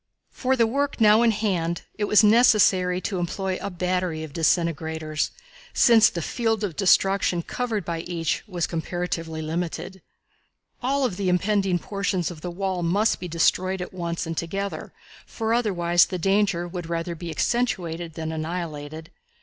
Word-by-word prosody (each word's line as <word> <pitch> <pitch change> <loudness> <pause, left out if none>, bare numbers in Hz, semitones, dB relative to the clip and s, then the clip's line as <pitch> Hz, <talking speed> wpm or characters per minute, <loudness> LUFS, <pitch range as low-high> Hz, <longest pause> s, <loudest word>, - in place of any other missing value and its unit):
For 260 0 0
the 235 -3 +3
work 280 +5 -1
now 215 0 +6
in 235 - +5
hand 185 -6 -1
it 210 - -1
was 210 +1 +5
necessary 210 -5 +4
to 190 -2 -3
employ 185 +2 -2
a 200 - -3
battery 180 -3 -2
of 155 -3 -9
disintegrators, 160 -1 0 0.5
since 230 -3 +6
the 170 - -4
field 225 0 -1
of 185 -6 -2
destruction 195 -2 +3
covered 225 -5 -3
by 170 -1 -3
each 165 -1 -2
was 175 -4 -1
comparatively 165 -1 -4
limited. 175 +3 -4 0.8
All 270 +2 +1
of 190 -8 -2
the 195 -2 0
impending 190 0 +1
portions 190 -1 -2
of 160 -3 -10
the 180 - -4
wall 185 0 -2
must 200 +6 +1
be 180 - -5
destroyed 185 +3 +1
at 180 - -6
once 170 -1 -3
and 165 0 -4
together, 195 +5 -4 0.4
for 225 -1 -2
otherwise 175 -7 +3
the 185 - -4
danger 195 -1 +1
would 175 -1 -6
rather 170 +1 -2
be 170 +1 -7
accentuated 175 -6 -1
than 160 -1 -4
annihilated. 160 -1 -5
180 Hz, 160 wpm, -24 LUFS, 170-205 Hz, 0.8 s, now